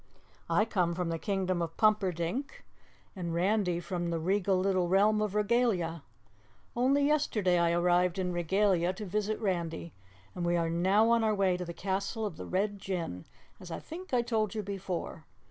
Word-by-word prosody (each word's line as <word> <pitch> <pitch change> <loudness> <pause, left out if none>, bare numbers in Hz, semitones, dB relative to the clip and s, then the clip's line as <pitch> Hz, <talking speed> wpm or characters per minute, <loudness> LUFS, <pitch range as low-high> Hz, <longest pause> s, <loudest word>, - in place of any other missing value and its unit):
"I 210 - +3
come 180 -6 0
from 175 -1 -2
the 165 0 -2
Kingdom 185 -3 -1
of 165 -1 -4
Pumperdink, 210 - 0 0.5
and 170 -3 -3
Randy 180 -1 +1
from 175 -1 -3
the 170 - -1
Regal 190 +3 +1
little 185 -1 +1
realm 210 +3 +4
of 210 -1 -2
Regalia. 210 -7 +1 0.7
Only 270 +4 +3
yesterday 215 -12 +2
I 170 0 +3
arrived 175 +1 +2
in 180 -1 -1
Regalia 180 +1 +2
to 210 +3 -7
visit 210 +2 -1
Randy, 170 -5 -2 0.4
and 180 - -4
we 175 0 +2
are 165 -1 0
now 195 +7 +3
on 230 -1 +3
our 215 -1 +2
way 190 -2 +2
to 180 0 -4
the 170 - -6
castle 195 +3 -2
of 200 -6 -4
the - - -7
Red 200 +2 -1
Jinn, 170 - -4 0.3
as 180 - -10
I 165 - -4
think 360 +4 -9
I 245 -2 +2
told 220 -3 -1
you 215 - -2
before. 185 -5 -5
190 Hz, 180 wpm, -30 LUFS, 175-210 Hz, 0.7 s, realm